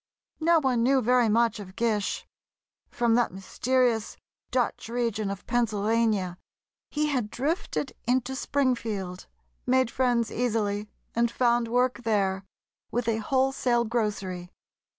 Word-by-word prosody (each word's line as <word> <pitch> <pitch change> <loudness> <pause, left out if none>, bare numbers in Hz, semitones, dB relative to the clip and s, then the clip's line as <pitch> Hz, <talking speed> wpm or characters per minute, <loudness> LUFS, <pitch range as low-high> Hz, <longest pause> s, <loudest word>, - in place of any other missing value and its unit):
No 335 +1 +4
one 260 -5 +1
knew 265 +3 +4
very 245 -1 +3
much 230 +1 +2
of 190 -2 -10
Gish. 220 -3 0 0.6
From 235 -1 +1
that 240 0 +3
mysterious 230 +4 0 0.3
"Dutch" 245 -2 -1
region 230 -4 -1
of 200 -1 -6
Pennsylvania, 215 -5 +1 0.5
he 300 0 0
had 250 -7 -1
drifted 290 - -2
into 255 +1 +1
Springfield, 230 -10 -1 0.4
made 255 -1 +3
friends 245 -3 +1
easily, 210 -3 -1 0.2
and 235 0 +2
found 240 0 +2
work 245 +1 +1
there, 200 -4 0 0.5
with 240 -1 -2
a 225 -1 +2
wholesale 260 0 +1
grocery. 200 -6 -2
235 Hz, 120 wpm, -27 LUFS, 210-250 Hz, 0.6 s, No